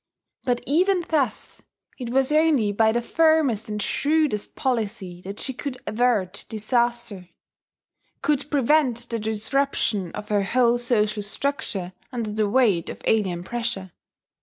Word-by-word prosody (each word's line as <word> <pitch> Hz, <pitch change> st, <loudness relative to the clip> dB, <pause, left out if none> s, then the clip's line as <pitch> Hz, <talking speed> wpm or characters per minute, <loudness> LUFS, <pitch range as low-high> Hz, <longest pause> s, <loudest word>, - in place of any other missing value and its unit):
But 245 Hz, -1 st, +1 dB
even 355 Hz, +4 st, +2 dB
thus 295 Hz, -5 st, -1 dB, 0.4 s
it 245 Hz, -2 st, -4 dB
was 265 Hz, +3 st, +2 dB
only 300 Hz, -9 st, +3 dB
by 220 Hz, +2 st, +3 dB
the 240 Hz, +1 st, -1 dB
firmest 310 Hz, -9 st, +2 dB
and 210 Hz, 0 st, -3 dB
shrewdest 290 Hz, -1 st, 0 dB
policy 210 Hz, -8 st, -2 dB
that 195 Hz, +2 st, -7 dB
she 265 Hz, -, -1 dB
could 260 Hz, 0 st, -5 dB
avert 215 Hz, -5 st, 0 dB
disaster, 235 Hz, -3 st, -1 dB, 0.9 s
could 295 Hz, -1 st, 0 dB
prevent 265 Hz, -4 st, +2 dB
the 230 Hz, -, -1 dB
disruption 220 Hz, -3 st, 0 dB
of 210 Hz, 0 st, -7 dB
her 205 Hz, -1 st, +2 dB
whole 240 Hz, +3 st, +2 dB
social 215 Hz, -3 st, +1 dB
structure 205 Hz, -, -2 dB, 0.2 s
under 230 Hz, -4 st, -3 dB
the 210 Hz, -1 st, 0 dB
weight 210 Hz, -8 st, +2 dB
of -, -, -8 dB
alien 185 Hz, -6 st, +1 dB
pressure. 230 Hz, -4 st, -3 dB
235 Hz, 135 wpm, -24 LUFS, 210-270 Hz, 0.9 s, only